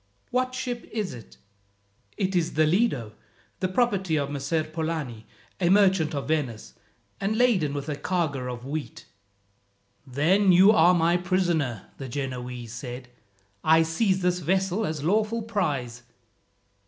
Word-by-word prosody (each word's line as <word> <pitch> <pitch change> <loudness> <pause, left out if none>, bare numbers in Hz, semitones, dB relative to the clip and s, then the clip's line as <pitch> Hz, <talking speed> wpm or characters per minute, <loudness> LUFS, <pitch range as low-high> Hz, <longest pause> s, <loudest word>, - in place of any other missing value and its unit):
"What 255 0 0
ship 250 -2 -4
is 215 -4 -3
it?" 120 -3 -12 0.8
"It 190 -2 -1
is 170 -2 +1
the 155 +1 +3
Lido, 155 - +1 0.5
the 185 - 0
property 190 -4 +1
of 140 -1 -2
Messer 145 +3 -1
Polani, 155 -7 -4 0.3
a 175 -2 +2
merchant 190 -5 +3
of 140 -2 -3
Venice, 135 -8 -2 0.5
and 200 +2 -1
laden 195 - +2
with 140 -1 -4
a 150 - -2
cargo 145 -7 -2
of 120 0 -8
wheat." 145 +2 -5 1.0
"Then 175 +10 +3
you 185 +4 +7
are 180 -3 +5
my 170 +1 +3
prisoner," 175 - -1
the 135 -2 -6
Genoese 125 -3 -5
said. 125 0 -7 0.5
"I 160 +1 +5
seize 185 +3 0
this 180 0 +1
vessel 190 +4 0
as 155 -2 -4
lawful 215 +6 +1
prize." 145 - -2
165 Hz, 140 wpm, -26 LUFS, 140-190 Hz, 1.0 s, you